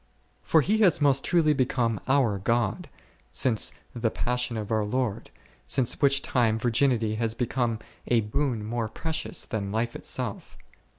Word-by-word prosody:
For 160 - +3
He 215 +9 +1
has 185 -8 +4
most 140 -2 +3
truly 165 -4 +3
become 125 -5 0
our 130 -7 +2
God 115 +1 -1 0.4
since 110 - +1 0.2
the 115 -1 0
Passion 125 0 -2
of 105 0 -5
our 110 -1 +2
Lord, 110 0 -2 0.4
since 130 +1 +1
which 140 -1 +4
time 115 -3 +1
virginity 115 -1 +1
has 115 -1 -1
be 125 - 0
come 120 -2 -1 0.3
a 120 -2 +3
boon 115 0 -1
more 115 0 -2
precious 160 +6 -2
than 100 -4 -4
life 115 +2 -1
itself. - - -4
120 Hz, 155 wpm, -26 LUFS, 110-135 Hz, 0.4 s, has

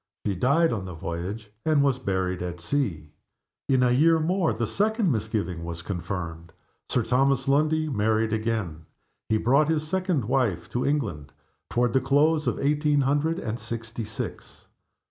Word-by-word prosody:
She 100 - +1
died 140 - +2
on 100 -4 -3
the 90 -2 -7
voyage, 90 +7 -5
and 155 -3 +3
was 135 -2 +2
buried 95 -5 -1
at 90 -1 -4
sea. 85 - -2 0.6
In 130 -2 +4
a 125 - +3
year 160 +6 +4
more 175 +2 +1
the 115 - -1
second 210 - +1
misgiving 105 -7 -2
was 85 0 -6
confirmed. 85 -3 -5 0.4
Sir 125 - +1
Thomas 135 +2 +2
Lundie 155 +3 +2
married 110 -3 +1
again. 110 -8 -2 0.4
He 110 - +3
brought 140 +7 +3
his 155 -1 0
second 180 - 0
wife 120 -8 0
to 125 - -1
England 110 - -2 0.4
toward 120 -1 +1
the 130 - +3
close 145 +3 +2
of - - 0
eighteen 145 0 +2
hundred 145 +5 +1
and 115 -7 -4
sixty 115 +1 -5
six. 110 0 -7
120 Hz, 160 wpm, -26 LUFS, 100-145 Hz, 0.6 s, In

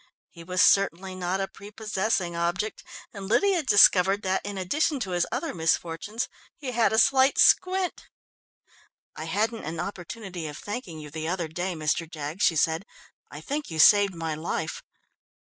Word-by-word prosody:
He 170 - -12
was 180 +2 +2
certainly 190 -1 +3
not 185 +1 -2
a 195 - -1
prepossessing 205 -3 -3
object, 175 +5 -2 0.3
and 200 -2 -7
Lydia 370 - +2
discovered 200 -5 +5
that, 190 0 0
in 205 -1 -5
addition 285 - 0
to 195 -4 -3
his 175 -1 0
other - - -3
misfortunes, 165 +7 -1 0.3
he 275 -6 -5
had 235 -2 +2
a 220 - +1
slight 265 +4 +4
squint. 370 0 +3 1.1
"I - - -6
hadn't 220 +2 -1
an 160 +1 -5
opportunity 180 -1 -6
of 150 - -8
thanking 205 -6 -6
you 150 -1 -9
the 160 +1 -5
other 175 -1 -2
day, 175 +3 -4
Mr. 155 +1 -1
Jaggs," 155 +4 -5
she 180 -5 +4
said. 160 +3 +1 0.5
"I - - -9
think 295 +1 -4
you 160 - -6
saved 200 +4 +6
my 165 -1 -3
life." 160 0 -4
190 Hz, 160 wpm, -26 LUFS, 165-215 Hz, 1.1 s, saved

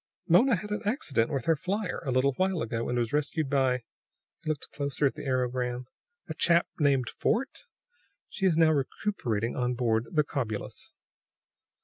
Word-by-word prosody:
"Mona 225 +9 +5
had 210 +3 -6
an 210 - -1
accident 180 - +1
with 135 -5 -2
her 165 - +4
flier, 185 +6 -2
a - - -3
little 130 +2 +3
while 185 +3 0
ago, 115 0 -3
and 120 - 0
was 120 +2 -1
rescued 150 0 0
by 130 -3 +2 0.3
" - - -58
he 160 - -4
looked 150 -2 -3
closer 140 0 -1
at 135 - +2
the - - -7
aerogram 125 -1 -1 0.4
"a - - -4
chap 170 0 +3
named 135 -5 +3
Fort. 255 - -1 0.6
She 195 - 0
is 165 -4 +2
now 160 -1 +6
recuperating 130 - -1
on 125 0 0
board 115 -2 +1
the 155 -3 +3
Cobulus." 120 -8 -4
140 Hz, 170 wpm, -28 LUFS, 125-170 Hz, 0.6 s, now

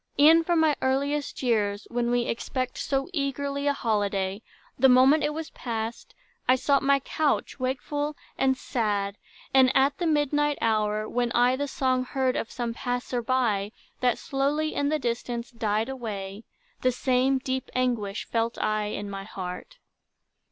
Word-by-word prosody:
E'en 320 +3 +7
from 340 0 +2
my 315 -2 +4
earliest 280 +2 -1
years, 210 -4 +1
when 240 0 0
we 245 0 +2
Expect 255 +2 -3
so 270 -1 -1
eagerly 280 -1 -2
a 285 - +3
holiday, 205 -5 -1 0.4
The 265 +1 +6
moment 265 +5 +6
it 295 - +1
was 315 +1 -6
past, 230 -1 -5 0.3
I 255 - +6
sought 275 +1 +2
my 275 0 +3
couch, 295 +1 -1
Wakeful 290 +3 -2 0.2
and 265 -1 +2
sad; 205 -5 -1 0.3
and 260 -1 +6
at 275 +1 +2
the 345 - 0
midnight 295 -1 +2
hour, 215 -1 +1
When 245 -1 -1
I 245 +1 +4
the 285 +2 -2
song 255 -2 0
heard 260 0 0
of - - -2
some 240 -2 -3
passer 245 0 -2
by, 225 -5 0 0.3
That 245 -2 +2
slowly 290 +3 -1
in 285 0 0
the 310 - +1
distance 235 -2 -3
died 220 -1 -1
away, 215 -5 -6 0.4
The 255 - +3
same 260 +2 +2
deep 260 0 -3
anguish 235 -5 -1
felt 230 0 -1
I 215 0 0
in 205 0 -4
my 195 -1 -6
heart. 180 -3 -7
255 Hz, 160 wpm, -26 LUFS, 225-275 Hz, 0.4 s, E'en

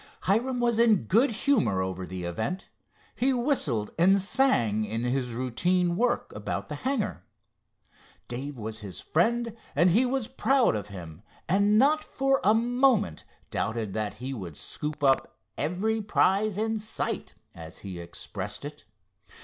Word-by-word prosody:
Hiram 245 +6 +1
was 235 -2 +2
in 225 - +5
good 225 - +3
humor 225 - +1
over 95 -1 -3
the 90 -1 -6
event. 110 - -3 0.5
He 265 +2 +2
whistled 195 - 0
and 190 +3 +5
sang 120 - +2
in 110 +2 -3
his 125 0 0
routine 170 +9 +1
work 240 +5 0
about - - -4
the - - -4
hangar. 240 - -2 1.0
Dave 135 +3 -5
was 110 0 -5
his 100 -4 -7
friend 230 +6 +1 0.2
and 170 +5 +5
he 240 +8 +4
was 255 -3 -1
proud 265 - +2
of 105 -1 -4
him, 85 -4 -9 0.3
and 200 +4 +3
not 300 +6 +4
for 270 0 +1
a 215 +3 +5
moment 240 - +2 0.3
doubted 110 -2 -2
that 105 -2 -2
he 130 +2 -5
would 90 - -7
"scoop 150 -1 -6
up 135 -1 +2 0.2
every 200 +9 0
prize 205 0 +2
in 220 +1 0
sight," 215 +1 -3 0.2
as 80 +1 -9
he 95 -3 -6
expressed 85 0 -6
it. - - -9
180 Hz, 150 wpm, -27 LUFS, -, 1.0 s, in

